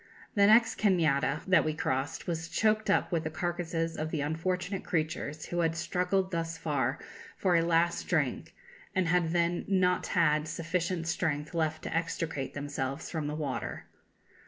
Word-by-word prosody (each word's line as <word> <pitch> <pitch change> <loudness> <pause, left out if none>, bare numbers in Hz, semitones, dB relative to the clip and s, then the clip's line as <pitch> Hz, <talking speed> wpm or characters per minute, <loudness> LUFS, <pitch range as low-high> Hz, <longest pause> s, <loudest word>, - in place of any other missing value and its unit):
The 200 -1 +5
next 225 +2 +5
cañada 160 -7 +2
that 185 -1 +5
we 155 -1 -1
crossed 135 +1 -2
was 165 -1 -3
choked 215 -1 +1
up 200 - +2
with 165 -2 0
the 155 - -2
carcasses 165 0 -2
of 155 0 -3
the 160 -3 -2
unfortunate 180 +5 -2
creatures 155 -2 -2
who 175 - -3
had 165 -1 +1
struggled 185 +2 0
thus 165 -1 -2
far 140 -3 0 0.4
for 185 -3 +2
a 165 - +5
last 170 0 +1
drink, - - -1 0.4
and 185 -2 +2
had 175 -1 +2
then 170 +1 +1
not 185 -2 +2
had 155 -4 +2
sufficient 170 +1 -2
strength 150 -2 -1
left 160 -2 -1
to - - -4
extricate 165 -4 -2
themselves 140 -2 -4
from 155 -3 -2
the 150 - -3
water. 145 -4 -4
165 Hz, 160 wpm, -30 LUFS, 155-180 Hz, 0.4 s, The